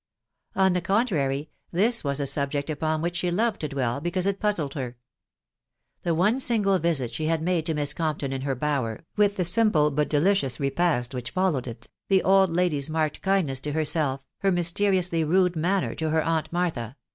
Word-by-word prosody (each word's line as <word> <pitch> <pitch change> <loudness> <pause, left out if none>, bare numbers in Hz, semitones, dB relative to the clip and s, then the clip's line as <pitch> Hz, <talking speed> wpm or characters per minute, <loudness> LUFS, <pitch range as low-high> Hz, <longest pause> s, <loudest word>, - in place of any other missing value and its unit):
On 190 -1 +3
the 180 - 0
contrary, 165 - 0 0.2
this 225 +7 +2
was 140 -1 -1
a 140 - -1
subject 140 +2 -1
upon 155 +1 -1
which 175 +1 -2
she 180 -1 0
loved 215 +5 0
to 155 - -1
dwell, 135 -2 -2
because 175 +3 0
it 200 0 0
puuded 175 -10 -1
her. 125 -4 -5 1.0
The 170 -2 0
.one 210 +10 +2
single 210 -7 +2
visit 150 -8 0
she 155 +6 -3
had 165 0 +1
made 165 0 -1
to 160 - -1
Miss 145 -1 +1
Com 155 -2 -1
p - - -12
ton 135 -2 -3
in 135 - -4
her 135 -1 -2
bower, 130 -4 -2
with 205 -1 +2
the 180 - -1
simple 175 -5 +3
but 150 +1 0
de 150 - +2
ttoious 165 -8 +1
repast 140 -3 0
which 125 -2 -6
iblkswed 185 -8 +1 0.5
iW 190 -1 +4
..• - - -11
ahe 195 0 +5
aid 190 - 0
lady's 165 -4 0
marked 155 -1 -1
lafetinesff 180 -9 0
to 150 - -3
bersetf,'her 155 +3 -1
mysteriously 175 -1 +1
nade 180 +2 +2
manner 180 +4 0
to 160 - -4
her^aunt 160 0 0
Iftartha 160 -9 -2
160 Hz, 195 wpm, -25 LUFS, 140-185 Hz, 1.0 s, ahe